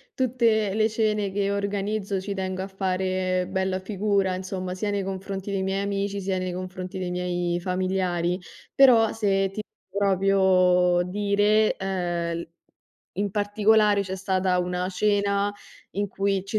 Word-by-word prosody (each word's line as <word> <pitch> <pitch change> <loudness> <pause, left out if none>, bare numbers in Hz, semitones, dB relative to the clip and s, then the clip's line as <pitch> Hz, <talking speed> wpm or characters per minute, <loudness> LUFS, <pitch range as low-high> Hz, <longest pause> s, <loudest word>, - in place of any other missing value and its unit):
tutte 230 -5 +2
le 220 0 +3
cene 215 -2 0
che 200 0 0
organizzo 200 0 -2
ci 200 +1 -4
tengo 185 0 -3
a 190 - -4
fare 185 -1 -1
bella 190 0 -1
figura 195 -1 0
insomma, 185 0 -4
sia 205 +2 -2
nei 200 -1 0
confronti 195 +1 -5
dei 195 -1 -1
miei 195 +1 -1
amici, 200 0 -2
sia 190 0 -1
nei 185 -1 -3
confronti 185 +1 -6
dei 180 -1 -3
miei 175 -1 -1
familiari, 180 -1 -1 0.4
però, 235 -5 +6
se 195 -3 +1
ti 215 +2 -5 0.3
proprio 185 -2 +3
dire, 205 +2 +2
ehm, 175 -3 -2
l - - -10 0.7
in 200 +1 -1
particolare 210 +1 +3
c'è 190 0 -5
stata 185 -1 0
una 180 +1 -1
cena 200 +1 +1 0.4
in 205 +1 -2
cui 195 0 -1
ci 215 +2 -1
195 Hz, 145 wpm, -25 LUFS, 185-205 Hz, 0.7 s, però